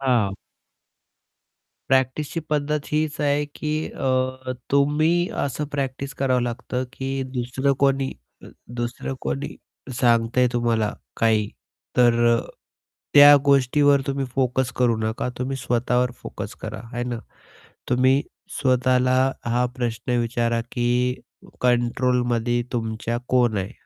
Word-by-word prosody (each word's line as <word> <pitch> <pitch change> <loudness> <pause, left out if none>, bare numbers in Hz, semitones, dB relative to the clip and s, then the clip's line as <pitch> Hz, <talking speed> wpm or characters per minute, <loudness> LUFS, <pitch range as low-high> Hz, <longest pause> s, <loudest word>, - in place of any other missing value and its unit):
हां. 120 -8 +1 1.6
प्रॅक्टिसची 135 +5 +1
पद्धत 150 0 -1
हीच 155 0 0
आहे 145 0 +1
की 150 -1 -3 0.2
अ, 130 -1 -1 0.2
तुम्ही 155 +5 +2 0.2
असं 145 +2 -3
प्रॅक्टिस 135 -1 -3
करावं 130 -2 +1
लागतं 125 +1 -3
की 135 0 -3
दुसरं 125 +3 0
कोणी 135 -1 +2 0.3
अ, - - -11 0.3
दुसरं 120 +2 -3
कोणी 140 +1 -4 0.4
सांगतंय 120 +1 +3
तुम्हाला 115 -3 +1 0.2
काही, 110 -2 +2 0.5
तर 120 -1 +4
अ, - - -1 0.7
त्या 145 0 +10
गोष्टीवर 140 +1 +4
तुम्ही 140 0 -1
फोकस 130 -1 +1
करू 120 -3 +2
नका. 110 +2 -2
तुम्ही 130 +2 -2
स्वतःवर 125 0 0
फोकस - - -7
करा - - -5
है 120 - -2
ना. 120 -2 -3 0.7
तुम्ही 130 +2 +3 0.4
स्वतःला 130 0 +2 0.3
हा 120 +1 +1
प्रश्न 120 0 -2
विचारा 115 0 0
की 125 +1 0 0.4
कंट्रोलमध्ये 120 -1 +1
तुमच्या 115 0 -2
कोण 120 -4 +3
आहे? 95 +4 -3
125 Hz, 115 wpm, -23 LUFS, 120-135 Hz, 1.6 s, त्या